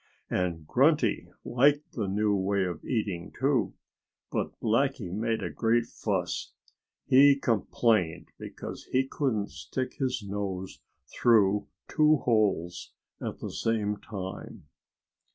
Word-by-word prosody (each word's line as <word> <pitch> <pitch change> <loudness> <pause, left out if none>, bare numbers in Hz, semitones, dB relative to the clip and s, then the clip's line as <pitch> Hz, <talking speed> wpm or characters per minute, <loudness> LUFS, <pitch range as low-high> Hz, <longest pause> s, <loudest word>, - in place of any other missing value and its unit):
And 85 -4 -1
Grunty - - +2 0.2
liked 145 +4 +3
the 110 -5 -3
new 105 +1 +1
way 100 0 +1
of 90 -3 -5
eating, 100 -8 -2
too. 130 -7 +1 0.6
But - - -3
Blackie 115 -4 0
made 115 +2 -1
a - - -3
great 115 +1 +2
fuss. 95 -6 -3 0.5
He 140 +2 +7
complained 110 -7 +1
because - - -8
he 130 +1 +1
couldn't 115 -9 -1
stick 130 -1 -5
his 130 -4 -1
nose 95 -2 -4 0.3
through 105 -3 +3 0.2
two 155 0 +4
holes 100 -8 0 0.3
at - - -5
the - - -4
same 105 -2 -1
time! 95 -6 -7
110 Hz, 115 wpm, -28 LUFS, 95-125 Hz, 0.6 s, He